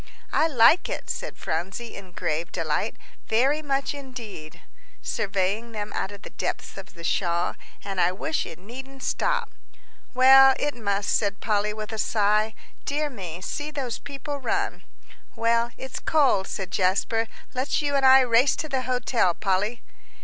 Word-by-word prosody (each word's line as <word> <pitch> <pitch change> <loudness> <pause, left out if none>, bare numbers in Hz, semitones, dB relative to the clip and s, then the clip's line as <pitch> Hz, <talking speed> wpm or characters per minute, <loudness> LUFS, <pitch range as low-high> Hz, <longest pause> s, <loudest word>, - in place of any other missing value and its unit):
"I 320 - +4
like 280 +3 +5
it," - - -3
said - - -5
Phronsie, 190 +8 -4
in 190 -3 -11
grave 165 +2 -2
delight, 165 +5 -1 0.3
"very 270 +7 +2
much, 275 -2 -1
indeed," 245 - -9 0.4
surveying 205 +3 -1
them 210 -1 -4
out 195 - -2
of 200 0 -11
the - - -9
depths - - -4
of 195 0 -10
the 170 - -11
shawl, 170 0 0 0.3
"and 195 -2 -1
I 175 - +4
wish 315 +12 -1
it 160 - -9
needn't 260 +7 -10
stop." 485 -2 0 0.6
"Well, 265 +1 +8
it 290 0 0
must," 205 -3 0
said 200 -2 0
Polly, 210 -1 +1
with 215 0 -6
a 220 - -4
sigh. 215 +1 +2 0.3
"Dear 295 +1 -1
me, 180 -7 -7
see 290 +10 -4
those 270 -6 -4
people 285 +1 -6
run." 395 +9 -2 0.5
"Well, 230 +1 +2
it's 265 -1 -6
cold," 270 -11 +3
said 190 -3 -4
Jasper; 200 +4 +1 0.3
"let's 260 +2 0
you 285 -1 0
and 275 -1 +2
I 265 0 +8
race 250 +2 +4
to 310 - -3
the 265 -3 -1
hotel, 250 -7 +1
Polly." 210 +4 0
230 Hz, 160 wpm, -25 LUFS, 195-270 Hz, 0.6 s, Well